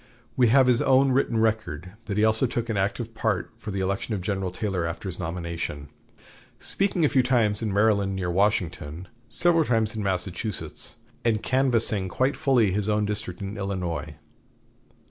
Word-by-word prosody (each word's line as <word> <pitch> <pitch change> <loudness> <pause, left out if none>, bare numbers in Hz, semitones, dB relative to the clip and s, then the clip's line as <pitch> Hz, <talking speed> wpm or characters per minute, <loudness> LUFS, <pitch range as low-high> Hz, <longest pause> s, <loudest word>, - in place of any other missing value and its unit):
We 125 -2 +4
have 130 +3 +5
his 125 -1 +3
own 135 0 +4
written 125 -3 +1
record 105 -7 -1
that 100 - -3
he 105 - +3
also 110 +4 +3
took 120 0 -3
an 110 - 0
active 110 +4 -1
part 110 -4 -1
for 110 - -7
the 100 -1 -2
election 100 +3 -1
of 95 - -4
General 95 -1 -1
Taylor 95 -2 -2
after 85 +4 -4
his 90 -1 -5
nomination, 85 -4 -4 0.7
speaking 190 -4 +1
a - - +5
few 135 -2 +3
times 120 -5 +2
in 110 -2 -1
Maryland 100 -1 +2
near 90 -2 -2
Washington, 90 -4 -1 0.2
several 170 -2 +3
times 115 -3 +1
in 110 - -3
Massachusetts, 95 +2 -3 0.3
and 110 -2 +1
canvassing 115 -7 +1
quite 130 +9 +1
fully 125 -9 +3
his 105 +2 0
own 105 0 +2
district 105 -3 -3
in 100 +2 -5
Illinois. 90 -6 -3
105 Hz, 170 wpm, -25 LUFS, 95-120 Hz, 0.7 s, have